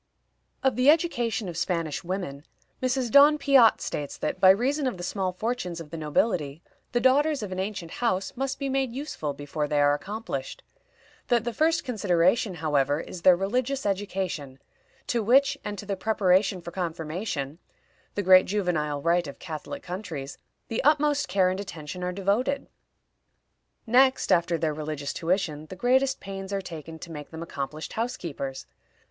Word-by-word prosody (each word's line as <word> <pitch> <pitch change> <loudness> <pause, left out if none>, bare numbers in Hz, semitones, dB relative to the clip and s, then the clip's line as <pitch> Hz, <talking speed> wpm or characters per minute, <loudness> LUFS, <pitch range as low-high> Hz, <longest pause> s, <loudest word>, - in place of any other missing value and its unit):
Of 265 -4 +2
the 255 +3 +5
education 240 - +2
of 175 - -6
Spanish 165 -2 -2
women, 175 -6 -4 0.4
Mrs. 255 -2 0
Donn 290 +3 +7
Piatt 275 -6 +5
states 145 -1 -4
that, 150 - -3
by 185 - +7
reason 265 +8 +3
of 245 - -2
the 175 - -7
small 185 +1 -1
fortunes 185 -3 -3
of 155 -3 -10
the - - -5
nobility, 155 -1 0 0.3
the 240 - +2
daughters 275 +2 +3
of 200 - -5
an 185 - -3
ancient 190 -4 -4
house 195 -6 -1
must 270 +1 -2
be 275 - -3
made 265 -3 -1
useful 210 - -4
before 145 +1 -3
they 150 0 +1
are 145 0 +5
accomplished; 195 -4 -5 0.6
that 235 -2 +2
the 240 0 -3
first 320 +7 +2
consideration, 200 -3 +1
however, 150 -2 +1
is 175 - -7
their 180 0 +7
religious 250 +8 -1
education, 185 -8 -2 0.5
to 235 - 0
which, 265 +6 +4
and 205 0 -4
to 205 - -7
the 200 -1 -2
preparation 190 -2 +2
for 170 - -8
confirmation 165 -3 -4 0.6
the 205 - -1
great 185 0 +7
juvenile 155 -8 -1
rite 170 0 +2
of 140 - -8
Catholic 180 - -7
countries 175 -7 -6 0.3
the 225 - -2
utmost 295 0 +3
care 185 0 +3
and 185 - -3
attention 180 -2 -6
are 180 - -1
devoted. 205 +9 0 1.2
Next 260 +3 +4
after 170 0 +3
their 160 -2 0
religious 150 -1 -4
tuition, 165 -4 -1
the 185 - -8
greatest 260 +5 +2
pains 195 0 -7
are 200 - 0
taken 165 -3 -8
to 165 - -10
make 150 -2 -8
them 160 0 -7
accomplished 155 -1 -5
housekeepers. 170 - -4
185 Hz, 165 wpm, -26 LUFS, 160-240 Hz, 1.2 s, Donn